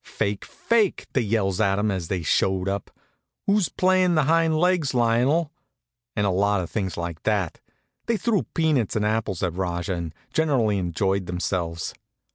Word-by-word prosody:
"Fake, 100 Hz, 0 st, -3 dB
fake!" 220 Hz, -5 st, 0 dB
they 130 Hz, -, +2 dB
yells 105 Hz, -3 st, 0 dB
at 100 Hz, -2 st, +2 dB
'em 105 Hz, +1 st, +1 dB
as 90 Hz, -4 st, -3 dB
they 90 Hz, -2 st, -2 dB
showed 95 Hz, +4 st, +1 dB
up. 100 Hz, 0 st, -2 dB, 0.6 s
"Who's 200 Hz, -3 st, +2 dB
playing 185 Hz, -1 st, +3 dB
the 155 Hz, -, +4 dB
hind 160 Hz, +1 st, +3 dB
legs, 170 Hz, -5 st, +2 dB
Lionel?" 125 Hz, +7 st, +2 dB, 0.6 s
and 105 Hz, -, +1 dB
a 100 Hz, -, +2 dB
lot 100 Hz, +2 st, +2 dB
of 85 Hz, -, -7 dB
things 95 Hz, -6 st, -2 dB
like 85 Hz, -2 st, -4 dB
that. 100 Hz, -6 st, -1 dB, 0.5 s
They 230 Hz, -1 st, +1 dB
threw 220 Hz, -3 st, 0 dB
peanuts 150 Hz, -, +1 dB
and 105 Hz, -1 st, +1 dB
apples 105 Hz, -4 st, -1 dB
at 90 Hz, -3 st, 0 dB
Rajah, 90 Hz, 0 st, -2 dB
and 85 Hz, -3 st, -5 dB, 0.2 s
generally 130 Hz, -11 st, +2 dB
enjoyed 95 Hz, +2 st, -1 dB
themselves. 90 Hz, -1 st, -2 dB
105 Hz, 165 wpm, -24 LUFS, 95-155 Hz, 0.6 s, the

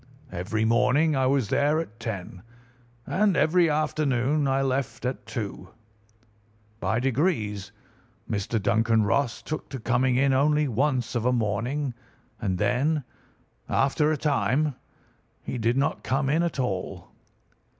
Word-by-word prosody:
Every 110 Hz, +6 st, -1 dB
morning 125 Hz, +7 st, +3 dB
I 130 Hz, -1 st, +2 dB
was 130 Hz, -5 st, +1 dB
there 150 Hz, +2 st, +2 dB
at 115 Hz, -9 st, -6 dB
ten, 95 Hz, -5 st, -6 dB, 0.6 s
and 200 Hz, -2 st, +2 dB
every 165 Hz, +3 st, +4 dB
afternoon 150 Hz, -2 st, +1 dB
I 135 Hz, 0 st, +1 dB
left 130 Hz, -3 st, -2 dB
at 125 Hz, +1 st, -3 dB
two. 100 Hz, -4 st, -5 dB, 1.1 s
By 110 Hz, +2 st, 0 dB
degrees 115 Hz, -, 0 dB, 0.6 s
Mr. 105 Hz, +2 st, -1 dB
Duncan 110 Hz, +2 st, +2 dB
Ross 120 Hz, +3 st, 0 dB
took 155 Hz, -, -5 dB
to 135 Hz, -, -6 dB
coming 125 Hz, +2 st, +1 dB
in 135 Hz, +1 st, +3 dB
only 150 Hz, +2 st, +3 dB
once 125 Hz, -1 st, 0 dB
of 120 Hz, -3 st, -1 dB
a -, -, +4 dB
morning, 120 Hz, +5 st, -1 dB, 0.5 s
and 95 Hz, -4 st, -1 dB
then, 140 Hz, -, +1 dB, 0.7 s
after 150 Hz, +3 st, +2 dB
a 155 Hz, -, 0 dB
time, 145 Hz, 0 st, +1 dB, 0.7 s
he 125 Hz, -, -4 dB
did 115 Hz, +3 st, +1 dB
not 140 Hz, -, 0 dB
come 135 Hz, +1 st, 0 dB
in 160 Hz, +3 st, +2 dB
at 170 Hz, -5 st, -2 dB
all. 100 Hz, -8 st, -3 dB
130 Hz, 135 wpm, -26 LUFS, 115-150 Hz, 1.1 s, every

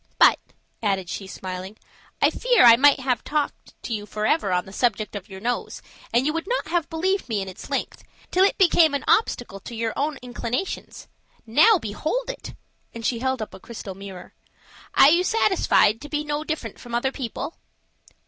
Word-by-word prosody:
But," -, -, +6 dB, 0.4 s
added 195 Hz, -5 st, -1 dB
she, 195 Hz, -, -5 dB
smiling, 185 Hz, +2 st, -7 dB, 0.5 s
"I -, -, +5 dB
fear -, -, +3 dB
I 230 Hz, -1 st, +10 dB
might 285 Hz, +3 st, +5 dB
have 250 Hz, -3 st, 0 dB
talked 300 Hz, -1 st, -3 dB
to 235 Hz, -, -4 dB
you 210 Hz, -1 st, -4 dB
forever 215 Hz, +2 st, 0 dB
on 180 Hz, 0 st, +1 dB
the 190 Hz, -, -12 dB
subject 215 Hz, -2 st, 0 dB
of 200 Hz, -1 st, -7 dB
your 190 Hz, -1 st, -9 dB
nose, 240 Hz, +4 st, -3 dB, 0.3 s
and 240 Hz, +3 st, +2 dB
you 305 Hz, -, +1 dB
would 330 Hz, +3 st, -3 dB
not -, -, -2 dB
have 340 Hz, -2 st, 0 dB
believed 370 Hz, 0 st, -1 dB
me 215 Hz, -3 st, 0 dB
in 195 Hz, -, -4 dB
its 185 Hz, -, -10 dB
length, -, -, -3 dB, 0.3 s
till 370 Hz, -, +4 dB
it 395 Hz, -, +2 dB
became 335 Hz, -5 st, +5 dB
an 280 Hz, -, -2 dB
obstacle 245 Hz, -, +1 dB
to 235 Hz, -, -9 dB
your 225 Hz, 0 st, -2 dB
own 290 Hz, +1 st, -1 dB
inclinations. 245 Hz, +6 st, -4 dB, 0.4 s
Now 305 Hz, -, +5 dB
behold 320 Hz, -, -3 dB
it!" -, -, -10 dB, 0.4 s
and 230 Hz, -1 st, -6 dB
she 235 Hz, -, 0 dB
held 260 Hz, -2 st, -1 dB
up -, -, -10 dB
a 190 Hz, -, -10 dB
crystal 210 Hz, -2 st, -8 dB
mirror. 190 Hz, -1 st, -10 dB, 0.6 s
"Are 280 Hz, -, +8 dB
you 345 Hz, +2 st, +4 dB
satisfied 370 Hz, -, +3 dB
to 295 Hz, -, -9 dB
be 300 Hz, 0 st, -1 dB
no 295 Hz, 0 st, -2 dB
different 315 Hz, 0 st, -5 dB
from 240 Hz, -1 st, -6 dB
other 265 Hz, +3 st, 0 dB
people?" 270 Hz, +4 st, -5 dB
245 Hz, 190 wpm, -24 LUFS, 210-315 Hz, 0.6 s, I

